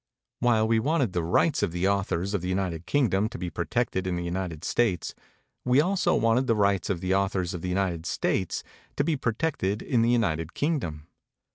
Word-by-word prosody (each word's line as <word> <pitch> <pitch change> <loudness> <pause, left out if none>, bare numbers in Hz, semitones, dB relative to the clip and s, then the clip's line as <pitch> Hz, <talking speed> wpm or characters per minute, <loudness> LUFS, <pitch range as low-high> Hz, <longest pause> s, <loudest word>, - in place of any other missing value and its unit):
While 115 -3 +3
we 115 0 +3
wanted 130 - +1
the 90 - 0
rights 85 +1 +2
of - - 0
the 90 +2 -1
au 100 0 +2
thors 95 +1 -2
of 100 - 0
the 90 - -3
United 90 -3 -2
Kingdom 110 -7 +2
to - - -7
be 90 -1 -4
protected 95 +4 -1
in 90 - -1
the 85 - -3
United 85 -2 -4
States, 100 -9 0 0.5
we 125 +2 +3
also 185 +4 +2
wanted 115 +3 +2
the 115 - +3
rights 100 -3 +1
of 90 -4 -1
the 95 0 0
authors 95 -2 0
of 90 - -5
the 90 - -3
United 90 -3 -1
States 90 +1 -1 0.3
to 140 - +2
be 160 +1 +1
protected 115 -5 -1
in 120 -3 +1
the 115 - +3
United 85 -9 0
Kingdom. 90 - -2
100 Hz, 205 wpm, -27 LUFS, 90-120 Hz, 0.5 s, While